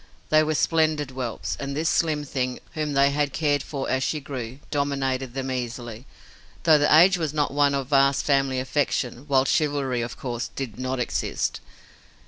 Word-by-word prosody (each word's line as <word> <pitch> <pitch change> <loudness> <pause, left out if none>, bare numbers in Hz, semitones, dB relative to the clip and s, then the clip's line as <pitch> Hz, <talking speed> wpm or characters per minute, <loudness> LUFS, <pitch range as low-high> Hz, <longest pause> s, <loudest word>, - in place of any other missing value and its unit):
They 155 0 +5
were 155 0 0
splendid 155 -3 +1
whelps, 125 -3 -4
and 140 0 -4
this 160 +1 0
slim 155 -2 +1
thing, 130 -3 -3
whom 155 -3 -2
they 140 0 +4
had 145 -1 0
cared 145 -3 +1
for 135 -1 -5
as 130 - 0
she 155 +3 -1
grew, 130 -3 -6
dominated 135 -3 -1
them 135 -1 -3
easily, 120 -1 -5 0.6
though 160 -2 +6
the 145 - +2
age 180 +4 +6
was 155 -2 -2
not 145 -2 0
one 145 -1 +3
of 135 -1 -3
vast 140 -1 +3
family 135 -2 +2
affection, 130 -1 -1
while 135 -2 +3
chivalry, 140 -5 0
of 115 0 -5
course, 120 -2 -4
did 125 -5 -5
not 130 0 -2
exist. 125 - -2
140 Hz, 175 wpm, -24 LUFS, 130-150 Hz, 0.6 s, though